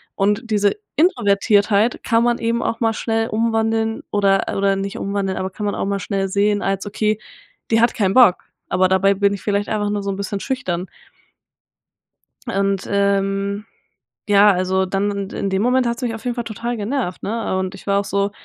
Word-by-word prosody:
und 205 +4 0
diese 205 - +2 0.2
Introvertiertheit 210 - +2
kann 230 -1 +2
man 240 0 +1
eben 235 +1 0
auch 230 - -2
mal 225 -1 +2
schnell 225 0 -1
umwandeln 225 0 0
oder 195 -1 +2
oder 195 0 +2
nicht 195 0 -4
umwandeln, 195 -1 -2
aber 190 0 -2
kann 210 +2 -5
man 205 - -1
auch - - -2
mal 200 0 -1
schnell 195 0 -2
sehen 205 +1 +1
als: 195 +1 -1
„Okay, 215 +1 0 0.5
die 225 0 +4
hat 235 - +3
keinen 195 -3 +1
Bock.“ 240 -8 +6 0.3
Aber 185 0 +3
dabei 190 +1 +3
bin 200 +1 +2
ich 200 - -6
vielleicht 205 0 -1
einfach 205 -1 -1
nur 205 -1 -2
so 200 - -3
'n - - -3
bisschen 200 0 -3
schüchtern. 185 -9 -3 1.6
Und, 195 -2 0
ähm, 200 0 0 0.6
ja, 205 0 +6
also 190 0 +1
dann 195 +2 -1
in 200 -1 -4
in 200 - -2
dem 190 0 0
Moment 250 +2 +2
hat's 235 +2 -3
mich 235 -2 -1
auf 225 - -11
jeden 245 -1 -1
Fall 240 - -3
total 235 +2 -4
genervt, 215 -3 -3
ne? 225 -3 -2
Und 190 +1 -3
ich 195 - -14
war 200 0 +3
auch 200 - -3
so: 200 0 0
205 Hz, 195 wpm, -20 LUFS, 195-225 Hz, 1.6 s, Bock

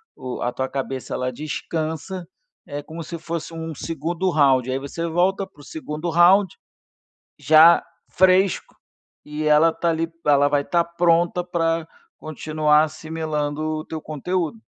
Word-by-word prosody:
o 130 -1 -6
a 120 - -1
tua 130 +1 -3
cabeça 135 -1 -4
ela 125 0 -2
descansa. 160 +5 -4 0.4
É 145 0 -5
como 165 +2 -8
se 170 +2 -7
fosse 165 0 -5
um 165 0 -5
2º 165 +4 -2
round, 135 -6 +3
aí 130 - 0
você 155 +5 -4
volta 185 +4 +1
para 145 - -19
o - - -14
2º 155 +2 -5
round 175 +3 +4 0.8
já 160 +2 +6 0.3
fresco 185 +1 +2 0.5
e 150 +1 -5
ela 155 +2 +5
está 170 +1 -1
ali 165 0 -1 0.2
ela 145 -1 +4
vai 145 0 +1
estar 170 +3 +1
pronta 170 +1 +1
para 165 -2 -1 0.3
continuar 155 0 +1
assimilando 155 -1 -4
o 155 0 -3
teu 160 -1 -6
conteúdo. 175 - -3
160 Hz, 145 wpm, -22 LUFS, 150-170 Hz, 0.8 s, já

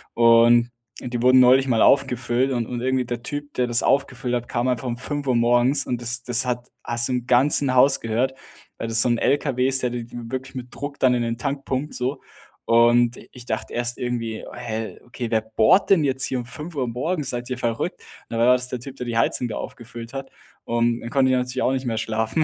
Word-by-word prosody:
Und 115 +1 +5 0.3
die 120 -1 -4
wurden 130 +1 +6
neulich 130 +2 +5
mal 115 -3 +2
aufgefüllt 130 -1 +2
und 120 -3 -1
und 120 -1 -4
irgendwie 130 -1 0
der 120 -1 -4
Typ, 145 +2 -6
der 125 -1 0
das 120 -1 +1
aufgefüllt 130 -3 0
hat, 120 0 -3
kam 120 +2 -1
einfach 125 0 -1
um 120 0 -3
5:00 140 -1 -2
morgens 120 +3 +3
und 120 -1 -2
das 120 0 -3
das 125 +1 +1
hat 125 -1 -3 0.2
hast 120 0 0
du - - 0
im 125 -1 -2
ganzen 130 +1 +3
Haus 135 +2 +5
gehört, 120 +4 0 0.4
weil 115 - -4
das 115 0 +2
so - - +1
'n 120 - +2
Lkw 135 -3 +1
ist, 135 0 +1
der 125 - 0
d 120 -1 -4
w 120 0 -8
wirklich 130 +1 -5
mit 125 -1 -8
Druck 145 0 -6
dann 130 -1 +4
in 120 - 0
den 115 0 -2
Tank 140 +1 -3
pumpt 135 +3 -3
so. 130 +2 -3 0.4
Und 120 +1 +4
i - - -14
ich 125 -1 -12
dachte 110 -2 -4
erst 120 0 -1
irgendwie: 115 -3 -3
„Hä, 115 -2 -5
okay, 120 -1 -5
wer 110 -1 +2
bohrt 110 - +3
denn 170 -6 +5
jetzt 135 -1 0
hier 125 -2 -3
5:00 150 0 -5
morgens? 140 +4 -2
Seid 120 +1 -5
ihr 125 - -3
verrückt?” 115 -2 -2 0.3
Dann 115 - -3
war 120 - +4
das 125 0 -1
der 125 - -4
Typ, 135 +2 -9
der 125 - -5
die 115 -1 -2
Heizung 120 +1 +1
wieder 110 - -5
aufgefüllt 115 0 -9
hat, 135 0 -6 0.3
und 120 0 0
dann 115 - -6
konnte 130 0 +2
ich - - +3
natürlich 125 +1 -2
auch - - +2
nicht 130 0 -3
mehr 115 -1 -1
schlafen. 110 +7 0
125 Hz, 230 wpm, -23 LUFS, 120-130 Hz, 0.4 s, wurden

